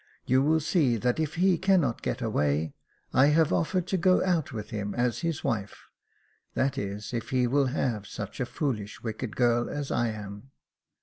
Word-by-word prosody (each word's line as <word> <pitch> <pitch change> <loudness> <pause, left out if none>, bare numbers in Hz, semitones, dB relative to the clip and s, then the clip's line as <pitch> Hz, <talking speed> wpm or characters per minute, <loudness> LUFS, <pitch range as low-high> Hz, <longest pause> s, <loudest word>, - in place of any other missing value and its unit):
You 130 +1 +3
will 155 +3 +3
see 150 -6 +2
that 125 +6 0
if 155 -1 -1
he 180 0 +3
cannot 180 -11 +2
get - - -2
away, 75 +1 0 0.4
I 135 - +6
have 155 +1 +3
offered 180 +1 +1
to 190 - +1
go 185 +1 +3
out 170 -5 +1
with 110 -3 -6
him 105 -2 -3
as 120 -1 0
his 165 -3 -2
wife, 100 -3 -3 0.7
that 135 +1 +1
is, 105 -2 -5
if 115 -2 -3
he 130 -1 +2
will 135 +2 +2
have 120 -6 -1
such 105 0 -7
a 125 - -1
foolish, 120 - -3
wicked 110 0 -4
girl 120 -1 +2
as 145 -1 -4
I 120 - +1
am." 105 +2 -7
125 Hz, 185 wpm, -28 LUFS, 110-155 Hz, 0.7 s, I